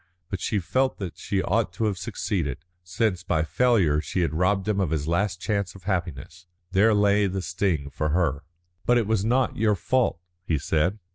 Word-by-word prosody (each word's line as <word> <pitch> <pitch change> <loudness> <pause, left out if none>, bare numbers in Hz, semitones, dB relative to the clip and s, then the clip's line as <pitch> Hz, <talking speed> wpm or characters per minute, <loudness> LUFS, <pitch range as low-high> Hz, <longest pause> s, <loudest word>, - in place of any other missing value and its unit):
But 95 -3 -3
she 105 - 0
felt 130 +8 0
that 95 -5 -6
she 95 -1 -1
ought 110 -1 +1
to 110 - -1
have 105 -2 0
succeeded, 75 -4 -3 0.2
since 90 +1 0
by 80 -3 0
failure 90 -6 +2
she 90 - -2
had 85 - 0
robbed 95 +4 +1
him 105 -2 +1
of 95 - +1
his 75 -2 -2
last 90 +2 0
chance 100 -2 -2
of 95 - -13
happiness. 85 -2 -4 0.2
There 105 +3 +4
lay 105 0 +3
the 95 0 -3
sting 85 -6 -1
for 75 +2 -2
her. 75 -3 0 0.4
"But 120 - +5
it 115 - +2
was 110 -2 +1
not 125 +4 +1
your 105 -1 +3
fault," 120 0 +1 0.2
he 80 -3 0
said. 80 +7 0
95 Hz, 195 wpm, -25 LUFS, 85-105 Hz, 0.4 s, But